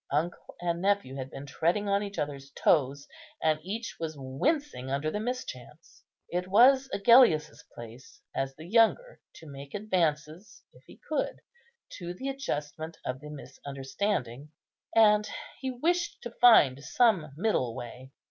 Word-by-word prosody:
Uncle 155 +5 -2
and 170 -1 -2
nephew 200 -8 +1
had 130 -1 -5
been 135 +1 -8
treading 170 +9 0
on 200 0 +2
each 200 -1 -6
other's 140 -2 -4
toes, 140 -2 +2 0.3
and 155 -1 +1
each 215 +7 -5
was 160 -1 -4
wincing 135 - -2
under 140 +3 -1
the 210 - -2
mischance. 170 - -7 0.3
It 180 +1 -2
was 260 +7 +5
Agellius's 215 -8 +4
place, 120 +2 -12
as 135 0 -2
the 155 - -11
younger, 230 - +2
to 160 - -13
make 140 +1 -9
advances, 175 -2 -2
if - - -20
he - - -15
could, - - -2 0.6
to 175 -1 -6
an 265 - -4
adjustment 160 - -4
of 130 +1 -3
the 150 +1 -10
misunderstanding; 140 - -4 0.5
and 210 -1 +5 0.3
he 265 - -3
wished 345 +8 -1
to 240 - -6
find 150 - +5
some 190 - +2
middle 160 - 0
way. 125 +2 -9
165 Hz, 145 wpm, -29 LUFS, 140-215 Hz, 0.6 s, was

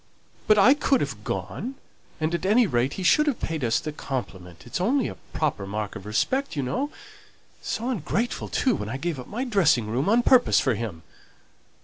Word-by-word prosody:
"But 215 - +6
I 230 +7 +7
could 280 -2 +2
have - - -4
gone; 260 +3 -4 0.4
and, 155 +1 -1
at 170 - -2
any 220 +5 +4
rate, 125 - 0
he 190 - -5
should 300 - +4
have 280 - 0
paid 160 -4 -3
us 115 -2 +2
the 155 - -5
compliment: 95 - -6
it's 120 - -4
only 255 +5 +2
a - - -5 0.2
proper 140 -11 -1
mark 105 +1 -4
of 95 - -8
respect, 260 - 0
you 140 - -1
know. 260 - -1 0.7
So 230 - -3
ungrateful, 230 - -2
too, 260 - +1
when 105 - -5
I 130 - -3
gave 165 -1 -3
up 125 - -8
my 240 +5 -3
dressing 175 - +3
room 125 - -1
on 235 +3 +4
purpose 250 0 +5
for 130 - +1
him!" 105 -7 -5
160 Hz, 200 wpm, -25 LUFS, -, 0.7 s, I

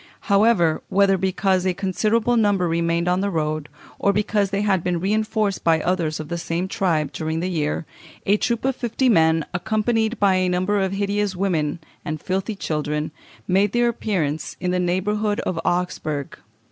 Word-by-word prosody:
However, 200 -6 +3
whether 195 0 +4
because 190 0 +1
a 185 -1 0
considerable 215 +5 +1
number 205 -5 +2
remained 170 +1 0
on 180 +1 +2
the 200 - 0
road, 155 -3 -2 0.3
or 200 - +3
because 205 0 +1
they 200 +1 -1
had 195 -4 +1
been 175 -1 0
reinforced 215 +1 0
by 165 -1 +4
others 165 -2 -1
of 155 - -5
the 170 +2 -3
same 170 +2 -2
tribe 160 -7 0
during 160 +2 -2
the 180 +2 -2
year, 155 -1 -1 0.4
a 200 - +4
troop 235 +2 -1
of 265 -1 +1
fifty 250 +2 0
men, 160 -5 +4
accompanied 220 +4 0
by 195 -2 +4
a 185 0 +1
number 185 +3 +1
of 190 0 -1
hideous 200 0 -1
women 170 -5 0 0.3
and 155 0 -4
filthy 190 +6 -2
children, 150 -3 -2 0.4
made 195 +2 +2
their 240 0 +3
appearance 170 -10 -2
in 180 - -1
the 180 - +1
neighbourhood 205 +4 0
of 170 - -2
Augsburg. 175 -6 -2
185 Hz, 170 wpm, -22 LUFS, 165-205 Hz, 0.4 s, whether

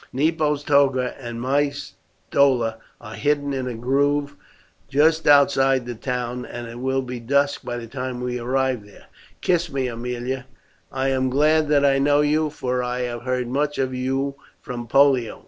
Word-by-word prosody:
Nepo's 150 +1 0
toga 140 -4 +2
and 120 -3 -6
my 140 +4 +1
stola 130 -4 -1 0.2
are 110 -2 -10
hidden 145 0 0
in 130 -1 -3
a 125 - -4
grove 140 +4 0 0.5
just 160 +3 +3
outside 135 -3 +4
the 120 - -4
town, 125 +1 -3
and 120 -1 -7
it 115 +1 -9
will 130 +1 0
be 125 -1 -6
dusk 140 +4 +1
by 120 - -4
the 120 - -6
time 125 +1 -5
we 125 0 -3
arrive 130 -1 0
there. 105 0 -17 0.4
Kiss 175 -2 +1
me, 135 -1 -1
Aemilia; 125 +2 -4 0.5
I 135 0 -1
am 130 -1 +1
glad 155 +3 +3
that 145 -1 +3
I 135 -1 +3
know 145 +1 +3
you, 150 +1 +1
for 125 -4 -2
I 125 0 -2
have 120 -1 -4
heard 125 0 -2
much 145 +4 -1
of 130 -1 -1
you 135 +2 -1 0.3
from 120 -2 -7
Pollio. 135 -2 +3
130 Hz, 170 wpm, -22 LUFS, 125-145 Hz, 0.5 s, outside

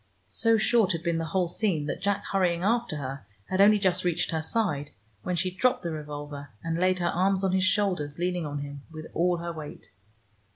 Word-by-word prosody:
So 225 - +2
short 215 -3 +3
had 165 -1 -4
been 170 -1 0
the 165 - -2
whole 180 +2 +1
scene 175 -4 0
that - - -4
Jack 200 +1 0
hurrying 180 -3 +1
after 230 -3 +1
her 135 -4 -6 0.2
had 190 +1 +3
only 210 +1 +7
just 185 -2 +1
reached 175 -2 0
her 160 -1 0
side, 155 -6 -1 0.3
when 180 - -2
she 185 +2 0
dropped 250 +7 +1
the 170 - -2
revolver, 145 -2 -6
and 165 0 -1
laid 185 0 +3
her 175 -1 0
arms 190 +2 +1
on 190 - +2
his 190 0 +2
shoulders, 185 -7 +1
leaning 175 -2 -1
on 145 0 -4
him 145 0 -7
with 155 -1 -8
all 175 +1 +2
her 170 0 -4
weight. 155 -2 -9
175 Hz, 210 wpm, -27 LUFS, 155-195 Hz, 0.3 s, only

